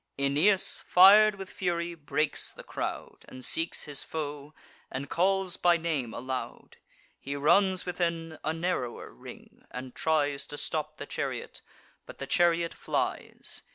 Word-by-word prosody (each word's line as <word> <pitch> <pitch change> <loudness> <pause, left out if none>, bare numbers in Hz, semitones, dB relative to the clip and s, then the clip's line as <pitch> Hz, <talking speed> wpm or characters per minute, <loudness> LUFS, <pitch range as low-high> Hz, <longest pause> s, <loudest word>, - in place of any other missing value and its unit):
Aeneas, 150 +9 +2
fir'd 205 +3 +8
with 195 -1 -8
fury, 175 -2 -2
breaks 150 -1 -1
the - - -11
crowd, - - -5
And 130 0 -8
seeks 165 +1 +2
his 145 -2 -2
foe, 150 -1 -6 0.3
and 135 +1 -6
calls 190 +1 +1
by 175 -1 +4
name 155 -8 -2
aloud: 130 +2 -6 0.4
He 140 +1 -5
runs 185 +6 +3
within 170 -3 -2
a 155 - 0
narrower 160 -8 -3
ring, - - -13
and 125 0 -7
tries 145 -3 0
To 145 - -7
stop 155 +1 -3
the - - -6
chariot; - - -4 0.5
but - - -11
the 135 - -5
chariot 170 +3 +2
flies. - - -2
160 Hz, 140 wpm, -29 LUFS, 140-175 Hz, 0.5 s, fir'd